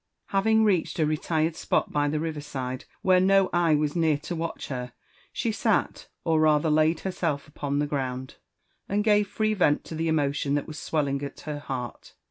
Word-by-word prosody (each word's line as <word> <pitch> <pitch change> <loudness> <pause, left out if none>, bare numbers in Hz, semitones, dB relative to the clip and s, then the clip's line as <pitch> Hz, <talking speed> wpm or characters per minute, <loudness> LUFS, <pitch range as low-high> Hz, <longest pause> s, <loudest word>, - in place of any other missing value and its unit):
HaYing 220 +3 +3
reached 185 -6 +1
a 160 - +3
retired 155 +1 0
spot - - 0
by 145 0 +1
the 150 +1 0
river 155 -2 -3
side, 130 -3 -5 0.2
where 185 -1 +5
no 195 0 +4
eye 170 -3 +4
was 150 +1 0
near 160 -3 +3
to 160 +4 -5
watch 165 0 -4
her, 125 -3 -5 0.4
she 230 - -1
sat 215 - 0 0.2
or 160 -2 +2
rather 155 0 +3
laid 155 +2 +3
herself 165 -6 -2
upon 145 -1 -3
the 145 - +1
ground, 130 -3 -4 0.5
and 205 +1 +1
gave 210 -1 +3
free 215 +1 0
vent 165 -7 +2
to - - -9
the 160 +1 -1
emotion 145 -2 +1
that 145 - -1
was 155 -2 -8
swelling 140 -3 -1
at 140 - -7
her 150 -1 -5
heart. 125 -4 -6
155 Hz, 190 wpm, -26 LUFS, 145-175 Hz, 0.5 s, where